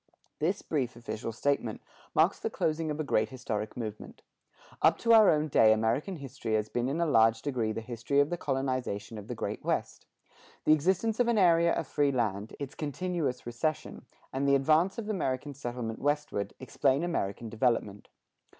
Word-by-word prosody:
This 180 +7 0
brief 130 -7 -2
official 115 -1 -5
statement 120 -2 -1 0.4
marks - - +3
the - - -2
closing 160 0 -1
of 150 0 -3
a - - 0
great 110 -6 +1
historic 110 -5 -4
movement. 110 -3 -7 0.6
Up - - +5
to 230 0 +3
our 220 -2 +8
own 155 0 +2
day 110 -6 +5
American 115 - +1
history 130 -6 -4
has 105 0 -1
been 120 +1 -1
in 150 +5 -2
a 170 - +2
large 115 -6 +4
degree 125 -6 -1
the 110 - -4
history 120 +4 -1
of 145 +3 +3
the - - +1
colonization 130 -8 -2
of 105 - -11
the - - -4
Great - - -4
West. - - -2 0.6
The 155 - +6
existence 190 +9 +1
of 245 - +3
an 235 -2 +2
area 170 -3 +5
of 165 - -1
free 145 -1 +1
land, 110 -4 -2
its 140 -1 -5
continuous 150 -3 -3
recession, 135 +7 -3 0.3
and 135 +1 0
the 140 - +5
advance 155 +7 +3
of 225 -2 -5
American 145 -8 -2
settlement 120 -4 -5
westward, 145 -8 -1
explain 135 +2 +1
American 115 - -2
development. 110 -3 -1
135 Hz, 175 wpm, -30 LUFS, 115-155 Hz, 0.6 s, our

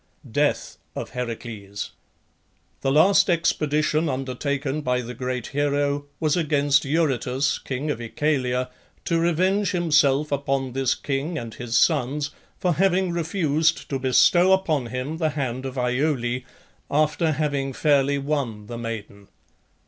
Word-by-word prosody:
DEATH - - 0 0.2
OF - - -5
HERACLES. 115 -5 -5 0.9
The 135 - +1
last 185 +8 +5
expedition 155 -2 +1
undertaken 135 +2 -2
by 125 -2 0
the 125 0 -7
great 125 0 -3
hero 145 0 0
was 155 -2 +2
against 145 -4 +2
Eurytus, 140 -3 0
king 135 +3 -3
of 130 - -4
Oechalia, 125 0 -1 0.3
to 165 -1 +1
revenge 185 +4 +1
himself 150 -4 +3
upon 135 -2 -1
this 135 -1 +1
king 145 +4 -3
and 115 -5 -6
his 120 -1 -2
sons 145 -1 +2 0.3
for 180 -1 +1
having 185 +1 +2
refused 165 -2 0
to 135 - -1
bestow 175 +8 +5
upon 160 -9 +1
him 130 +6 -4
the 160 -2 +1
hand 130 -3 -3
of 130 0 -7
Iole, 125 -1 0 0.5
after 155 +2 +2
having 140 -2 -1
fairly 140 0 +2
won 135 -7 -2
the 115 +2 -7
maiden. 105 -3 -6
140 Hz, 130 wpm, -24 LUFS, 125-155 Hz, 0.9 s, last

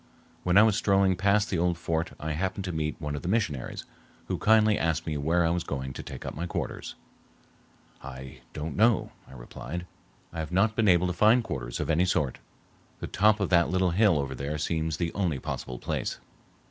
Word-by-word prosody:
When 90 +1 +2
I 105 - +9
was 110 -2 +4
strolling 95 -3 +3
past 100 +3 +2
the 90 - 0
old 85 0 +1
fort 80 0 -2
I 80 +1 -3
happened 95 +5 -2
to 90 - -3
meet 75 -2 -3
one 75 -2 -3
of 70 - -5
the - - -6
missionaries, 90 - -1 0.4
who - - -1
kindly 110 -1 +5
asked 80 -3 0
me 80 - -2
where 80 +4 +1
I 80 - +2
was 85 0 -1
going 65 -4 -4
to - - -6
take - - -8
up - - -4
my 85 +4 -4
quarters. - - -4 1.1
"I 65 0 -9
don't 75 +1 -5
know," 115 +2 +3 0.2
I - - -14
replied. 65 +6 -7 0.5
"I 85 - -5
have 80 0 -4
not 100 +5 +2
been 110 -2 +2
able 90 -1 +5
to 90 - -1
find 110 +6 +4
quarters 65 - -5
of - - -2
any 85 +3 +3
sort. 75 -7 0 0.6
The - - -4
top 105 +2 +3
of 100 - 0
that 85 -3 +4
little 90 0 +2
hill 100 -2 +4
over 70 -2 -2
there 70 +4 -4
seems 80 0 -1
the 85 -2 -2
only 90 -8 0
possible 65 -1 -5
place." - - -3
85 Hz, 210 wpm, -28 LUFS, 75-95 Hz, 1.1 s, I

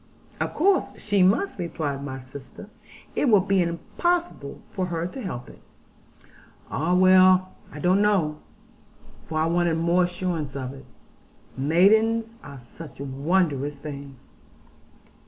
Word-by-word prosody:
'Of - - -3
course 380 +3 +1
she 205 -2 +1
must,' 200 - +2
replied 150 -5 -3
my 130 -2 -5
sister, 130 - -12 0.4
'it 285 - +2
will 210 -3 +6
be 195 0 +2
impossible 180 - -2
for 185 -2 -2
her 165 -1 -2
to 220 +9 -6
help 125 - -6
it.' - - -15 1.1
'Ah 165 +5 0
well! 185 0 +5 0.2
I - - -10
don't 180 +6 +2
know,' 175 -8 +1 0.9
for 155 - -4
I 160 - +2
wanted 170 0 +1
more 170 +2 +2
assurance 175 -6 -3
of 130 -1 -4
it. 135 -1 -12 0.7
'Maidens 220 +10 +3
are 140 -1 -10
such 135 +5 -12
wondrous 145 +1 -1
things!'' 140 -3 -9
170 Hz, 130 wpm, -25 LUFS, 140-190 Hz, 1.1 s, will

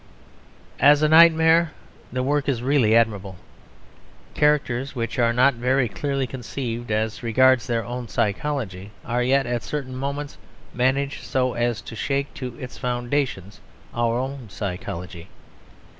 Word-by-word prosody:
As 145 +1 +6
a - - +5
nightmare, 160 0 +6 0.4
the 125 +1 -2
work 145 +1 0
is 120 -3 -1
really 130 -5 +3
admirable. 105 -5 +1 1.0
Characters 140 -3 +1
which 115 +1 -3
are 115 -1 +3
not 130 +4 +4
very 125 +2 +1
clearly 135 +3 -2
conceived 120 -1 -5
as 110 +1 -1
regards 130 +1 +3
their 115 -3 -1
own 120 +1 -5
psychology 105 -3 -2 0.2
are 120 +1 -1
yet, 135 +2 +2
at 120 -1 -2
certain 130 +4 -5
moments, 140 +2 -5 0.3
managed 135 +3 0
so 130 -2 0
as 120 -2 -1
to 115 - -9
shake 140 +5 -2
to 125 -3 -7
its 125 +1 -9
foundations 120 -5 -2 0.3
our 120 0 0
own 130 -2 -5
psychology. 90 -3 -6
125 Hz, 135 wpm, -23 LUFS, 115-140 Hz, 1.0 s, As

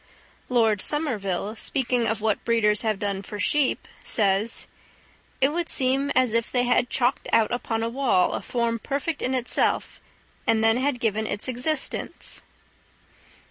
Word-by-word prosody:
Lord 225 -5 +2
Somerville, 215 - 0
speaking 245 -1 -1
of 220 -1 -1
what 215 -1 0
breeders 210 -2 +2
have 220 -4 0
done 200 -1 -3
for 205 +1 -8
sheep, 290 +4 +1 0.2
says: 205 +1 +1 0.7
"It 270 - +4
would 335 +2 -3
seem 270 +1 0
as 255 -3 +3
if 230 -1 0
they 250 -1 +1
had 245 0 +1
chalked 250 +1 0
out 225 -1 +3
upon 225 -2 -2
a - - 0
wall 245 -7 +1
a - - -3
form 235 -1 -2
perfect 285 +5 -3
in 260 +1 -1
itself, 250 -1 0 0.5
and 220 -1 +2
then 225 +1 +4
had 260 -1 -1
given 220 -2 -1
it 205 - +4
existence." 255 +5 -1
235 Hz, 150 wpm, -24 LUFS, 215-260 Hz, 0.7 s, It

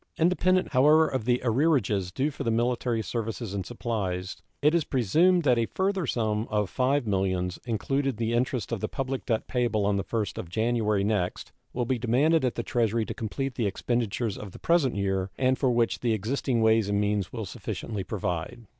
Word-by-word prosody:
Independent, 185 +2 +2
however 150 +5 +5
of 130 -5 -3
the 125 0 +2
arrearages 115 - +2
due 135 +9 -1
for - - -6
military 120 0 0
services 115 -2 -4
and 100 -2 -2
supplies, 95 -5 -3 0.2
it 150 +2 +3
is 170 -2 +3
presumed 160 - +3
that 125 -4 +3
a 115 - +1
further 190 -4 -1
sum 110 -2 -1
of 105 -3 -1
$5 130 +1 +2
millions, 95 -3 -1
including 135 +4 0
the 115 +1 -1
interest 125 0 -1
on 115 - -2
the - - -2
public 135 -1 -4
debt 115 -3 0
payable 120 -5 0
on 100 0 +2
the 100 - -1
1st 110 -4 -3
of 85 - -6
January 110 0 +1
next, 100 -4 -1 0.2
will 120 0 -2
be 125 0 -1
demanded 135 +7 +3
at 125 - 0
the 115 - -2
Treasury 115 -2 0
to - - -5
complete 135 +5 -3
the 115 -3 -1
expenditures 115 0 -1
of 100 -3 -8
the - - -9
present 165 -9 +2
year, 95 -1 -1
and 130 0 +2
for 130 - +2
which 120 -1 +1
the 120 -2 +1
existing 115 +2 0
ways 110 -2 +3
and 100 0 +1
means 105 -2 0
will 115 -3 -4
sufficiently 105 0 -5
provide. 95 +4 -4
115 Hz, 190 wpm, -27 LUFS, 105-130 Hz, 0.2 s, however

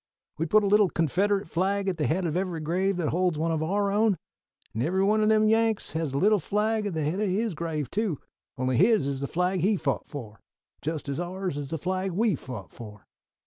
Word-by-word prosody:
We 165 - 0
put 215 +6 +4
a - - +1
little 205 -1 +4
Confederate 195 +6 +1
flag 195 +4 0
at 185 -3 -1
the 150 - 0
head 175 +4 0
of 160 -1 -1
every 180 -2 -1
grave 180 +5 0
that 170 -4 0
holds 180 -1 +1
one 165 +2 0
of 160 -1 -1
our 200 +5 0
own; 210 -1 +2 0.6
and 110 - -2
every 185 +8 +1
one 215 +2 +3
o' 215 - +3
them 215 0 +4
Yanks 225 -1 +2
has 160 -3 -2
a - - 0
little 210 +6 +4
flag 210 +4 0
at 190 - -4
the 155 - -1
head 160 +7 -1
of 210 -2 +1
his 210 +2 0
grave 155 -3 -3
too, 205 -7 -1 0.4
only 130 -1 0
his 215 -3 +4
is 140 -1 -2
the 140 - -3
flag 180 +4 0
he 200 +5 +2
fought 145 -6 -2
for, 110 -7 -8 0.4
just 155 -1 -3
as 140 +2 -3
ours 180 -1 -3
is 145 -2 -5
the 165 - -2
flag 185 +3 -2
we 215 +3 +2
fought 125 - -7
for. 105 -3 -11
180 Hz, 230 wpm, -27 LUFS, 155-205 Hz, 0.6 s, put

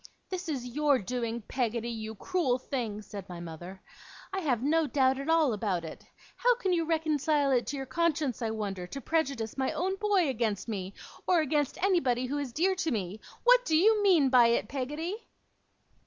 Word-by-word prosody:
'This 365 -2 -4
is 265 -5 -3
your 295 -2 +3
doing, 235 +1 -3
Peggotty, 235 0 -2
you 220 -1 -5
cruel 310 - 0
thing!' 230 -5 -4
said 200 -2 -9
my 175 -1 -7
mother. 175 +3 -8 0.5
'I 385 - 0
have 255 -9 0
no 315 +2 +2
doubt 265 0 +2
at 275 +3 -4
all 320 -6 +4
about 195 -5 -1
it. 160 - -9 0.3
How - - +4
can 390 -6 -1
you 335 -2 +1
reconcile 310 -3 +1
it 245 -2 +2
to 285 - -3
your 270 - -4
conscience, 305 -5 0
I 225 - 0
wonder, 200 -5 -4
to 275 - -6
prejudice 275 -7 -1
my 265 - +1
own 380 +3 -1
boy 405 -5 +2
against 225 -6 -1
me, 195 -3 -4 0.3
or 355 -3 +4
against 295 -2 0
anybody 265 -11 +2
who 285 +3 -2
is 280 -4 -4
dear 355 +10 +2
to 330 - 0
me? 210 - -3 0.2
What - - +6
do 315 -9 +2
you 425 +5 +4
mean 350 -9 +5
by 250 -2 +6
it, 235 -2 +1
Peggotty? 295 - -3
270 Hz, 190 wpm, -29 LUFS, 225-325 Hz, 0.5 s, What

